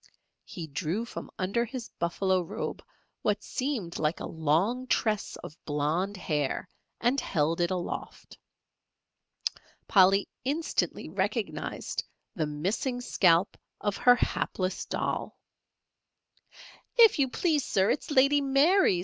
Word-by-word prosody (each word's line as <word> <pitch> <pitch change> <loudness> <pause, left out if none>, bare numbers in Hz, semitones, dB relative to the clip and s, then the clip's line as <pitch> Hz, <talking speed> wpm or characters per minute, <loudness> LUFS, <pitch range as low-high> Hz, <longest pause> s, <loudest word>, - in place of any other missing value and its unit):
He 170 - -7
drew 165 +9 -2
from - - -7
under 200 +6 0
his 240 0 -6
buffalo 185 +2 +1
robe 205 +6 -5 0.4
what - - 0
seemed 250 -11 -3
like 155 +1 0
a - - -4
long 170 - 0
tress 215 -4 0
of 150 - -8
blond 160 +7 -1
hair, 150 -6 -1 0.3
and 250 +3 +2
held 165 -1 0
it 170 - +2
aloft. 180 -2 -5 1.5
Polly 195 0 +5 0.2
instantly 295 +6 -1
recognized - - -2 0.3
the 160 -7 -1
missing 195 - -2
scalp 180 -6 +3 0.2
of 205 -1 -1
her 245 0 +6
hapless 185 -5 -1
doll. - - -2 1.6
"If 455 -8 +7
you 270 -2 +3
please, 305 +1 +1
Sir, 195 -3 +2
it's - - -2
Lady 285 0 +4
Mary's. 275 - +4
195 Hz, 115 wpm, -29 LUFS, 170-255 Hz, 1.6 s, If